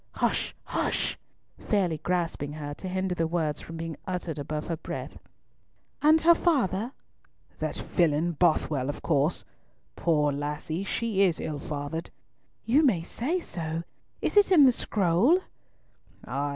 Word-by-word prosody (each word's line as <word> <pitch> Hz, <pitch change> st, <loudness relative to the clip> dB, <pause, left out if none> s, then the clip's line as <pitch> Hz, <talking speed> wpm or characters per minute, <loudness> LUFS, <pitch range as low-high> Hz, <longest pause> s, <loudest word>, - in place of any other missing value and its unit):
"Hush! -, -, 0 dB
hush!" -, -, -1 dB, 0.4 s
fairly 180 Hz, -7 st, 0 dB
grasping 165 Hz, -4 st, -1 dB
her 145 Hz, -1 st, -5 dB
to 185 Hz, -, -7 dB
hinder 185 Hz, 0 st, -1 dB
the 165 Hz, -2 st, 0 dB
words 160 Hz, -3 st, -1 dB
from 165 Hz, -, -8 dB
being 165 Hz, -2 st, -5 dB
uttered 175 Hz, -4 st, -3 dB
above 150 Hz, +1 st, -3 dB
her 165 Hz, -, -2 dB
breath. -, -, -6 dB, 0.8 s
"And 310 Hz, +2 st, +6 dB
her 340 Hz, +1 st, +7 dB
father?" 250 Hz, -, +1 dB, 0.7 s
"That -, -, -2 dB
villain, 165 Hz, -1 st, +1 dB
Bothwell, 155 Hz, -5 st, +1 dB
of 145 Hz, -, -5 dB
course. 150 Hz, +1 st, +1 dB, 0.5 s
Poor 150 Hz, -3 st, +2 dB
lassie, 150 Hz, +5 st, -3 dB
she 215 Hz, -1 st, -1 dB
is 180 Hz, -5 st, +3 dB
ill 150 Hz, -2 st, -3 dB
fathered!" 145 Hz, +3 st, -4 dB, 0.6 s
"You 275 Hz, +7 st, +4 dB
may 200 Hz, -, +3 dB
say 285 Hz, -, -2 dB
so. 165 Hz, -, -4 dB, 0.4 s
Is -, -, 0 dB
it 410 Hz, -1 st, +6 dB
in 310 Hz, -6 st, +8 dB
the 260 Hz, -, +7 dB
scroll?" 205 Hz, -, +3 dB, 0.9 s
"Ay! 140 Hz, +1 st, -2 dB
170 Hz, 140 wpm, -28 LUFS, 150-205 Hz, 0.9 s, in